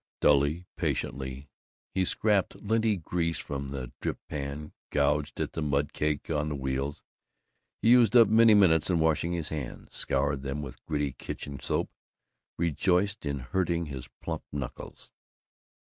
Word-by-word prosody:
Dully, 75 Hz, +5 st, +3 dB
patiently, 65 Hz, +1 st, -2 dB, 0.5 s
he 95 Hz, -, +2 dB
scraped 105 Hz, 0 st, +1 dB
linty 110 Hz, 0 st, +1 dB
grease 85 Hz, -1 st, -1 dB
from 70 Hz, -1 st, -4 dB
the 65 Hz, -3 st, -5 dB
drip -, -, -2 dB
pan, 75 Hz, +1 st, -5 dB, 0.2 s
gouged 75 Hz, 0 st, +1 dB
at -, -, -2 dB
the -, -, -3 dB
mud 70 Hz, -1 st, 0 dB
caked 75 Hz, +1 st, -1 dB
on 75 Hz, -1 st, 0 dB
the 75 Hz, -, -2 dB
wheels. 65 Hz, +1 st, -3 dB, 0.8 s
He 115 Hz, -, +6 dB
used 120 Hz, -3 st, +6 dB
up 115 Hz, -3 st, +9 dB
many 110 Hz, 0 st, +6 dB
minutes 80 Hz, -6 st, +5 dB
in 90 Hz, -, +3 dB
washing 80 Hz, +1 st, +2 dB
his 85 Hz, -3 st, -2 dB
hands; 75 Hz, -5 st, -6 dB
scoured 70 Hz, 0 st, +1 dB
them 70 Hz, +2 st, -3 dB
with 65 Hz, -3 st, -9 dB
gritty 75 Hz, -3 st, 0 dB
kitchen 70 Hz, +2 st, -6 dB
soap; -, -, -1 dB, 0.7 s
rejoiced 90 Hz, +3 st, +1 dB
in 70 Hz, 0 st, -1 dB
hurting 85 Hz, +5 st, 0 dB
his 70 Hz, -4 st, -7 dB
plump -, -, -3 dB
knuckles. 70 Hz, -4 st, -7 dB
75 Hz, 145 wpm, -29 LUFS, 70-90 Hz, 0.8 s, up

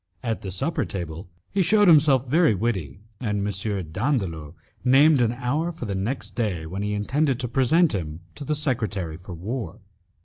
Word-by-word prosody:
At 115 Hz, -2 st, -2 dB
the 95 Hz, -, -5 dB
supper 100 Hz, -, -1 dB
table 85 Hz, -2 st, -6 dB, 0.2 s
he 200 Hz, -, +1 dB
shewed 205 Hz, +3 st, +4 dB
himself 145 Hz, -5 st, +6 dB
very 155 Hz, -3 st, +4 dB
witty, 95 Hz, -, -2 dB, 0.2 s
and 105 Hz, -4 st, -1 dB
M. 95 Hz, -4 st, -3 dB
Dandolo 95 Hz, -, -2 dB, 0.3 s
named 135 Hz, +3 st, +5 dB
an 115 Hz, -1 st, +2 dB
hour 135 Hz, +7 st, -1 dB
for 165 Hz, -7 st, -7 dB
the 100 Hz, -, -3 dB
next 105 Hz, +8 st, -3 dB
day, 100 Hz, -9 st, -2 dB
when 95 Hz, +5 st, -5 dB
he 105 Hz, 0 st, -1 dB
intended 135 Hz, +5 st, 0 dB
to 125 Hz, -, -2 dB
present 140 Hz, +7 st, +3 dB
him 80 Hz, -4 st, -4 dB
to -, -, -8 dB
the 150 Hz, +2 st, -1 dB
secretary 110 Hz, -, -1 dB
for 90 Hz, 0 st, -9 dB
war. 110 Hz, +5 st, -5 dB
115 Hz, 175 wpm, -24 LUFS, 95-140 Hz, 0.3 s, himself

